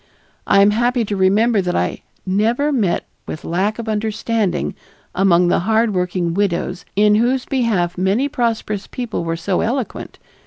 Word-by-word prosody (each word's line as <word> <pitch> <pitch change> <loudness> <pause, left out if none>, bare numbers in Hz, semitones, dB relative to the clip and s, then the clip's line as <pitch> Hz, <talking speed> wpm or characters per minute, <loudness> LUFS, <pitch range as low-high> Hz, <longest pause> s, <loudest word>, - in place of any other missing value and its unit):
I 200 - +5
am 205 - +5
happy 240 +2 +1
to 205 - -3
remember 200 +3 +3
that 180 -1 -2
I - - -1 0.2
never 225 +10 +1
met 210 -11 0 0.2
with 155 - -7
lack 190 +6 0
of 230 -1 -6
understanding 215 -1 -1 0.4
among 180 -2 +3
the - - +2
hard 220 +3 +1
working 180 -2 -1
widows, 180 -2 -1
in 210 +1 +4
whose 245 +4 +2
behalf 200 -10 0
many 200 +9 +1
prosperous 230 -6 -2
people 240 -7 -4
were 165 0 -2
so 180 +2 -1
eloquent. 245 -2 -3
210 Hz, 155 wpm, -19 LUFS, 185-230 Hz, 0.4 s, I